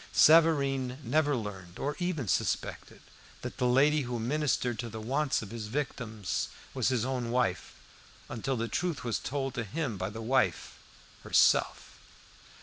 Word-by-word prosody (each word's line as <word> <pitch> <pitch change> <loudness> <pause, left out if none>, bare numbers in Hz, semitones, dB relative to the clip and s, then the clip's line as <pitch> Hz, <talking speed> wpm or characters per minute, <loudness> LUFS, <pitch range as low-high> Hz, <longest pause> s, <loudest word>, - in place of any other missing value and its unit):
Savareen 140 -5 +4
never 145 +3 +2
learned 95 -6 -6
or 145 +1 -2
even 175 - -2
suspected, - - -2 0.4
that - - -6
the 125 - +1
lady 145 +4 +4
who 120 -2 -3
ministered 125 -1 0
to 120 -1 -3
the 110 0 -7
wants 135 +4 0
of 105 - -9
his 115 -2 -5
victims 110 -5 -3 0.2
was - - 0
his 125 -3 +1
own 125 -3 -2
wife, 115 -8 0 0.5
until 120 +3 -2
the 115 +1 -1
truth 175 +4 -2
was 120 -2 -1
told 135 -2 -3
to 115 - -2
him 130 0 -3
by 95 +1 -2
the 110 +2 -8
wife 120 +4 0 0.5
herself. - - +2
125 Hz, 150 wpm, -30 LUFS, 115-145 Hz, 0.5 s, Savareen